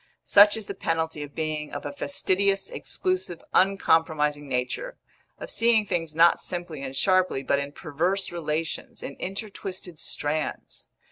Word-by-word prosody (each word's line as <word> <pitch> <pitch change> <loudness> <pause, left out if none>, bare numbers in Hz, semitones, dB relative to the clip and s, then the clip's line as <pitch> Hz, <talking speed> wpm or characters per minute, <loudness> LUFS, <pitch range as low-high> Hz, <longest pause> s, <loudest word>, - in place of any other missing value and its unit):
Such 205 +2 +7
is 220 - -5
the - - -5
penalty 160 -2 -1
of 145 -1 -8
being 155 -1 -2
of - - -6
a - - -4
fastidious, 200 - 0
exclusive, 370 - -2
uncompromising 160 -6 +2
nature; 130 - -2 0.4
of - - -7
seeing 230 -2 +4
things 165 -5 -2
not 170 +1 +5
simply 175 -5 -4
and 135 -1 -5
sharply, 185 -5 +2
but 140 +1 +2
in 140 0 -4
perverse 170 +7 -1
relations, 160 -1 -3
in 140 - -6
intertwisted 190 -3 -6
strands. 150 +1 -3
165 Hz, 140 wpm, -26 LUFS, 150-195 Hz, 0.4 s, Such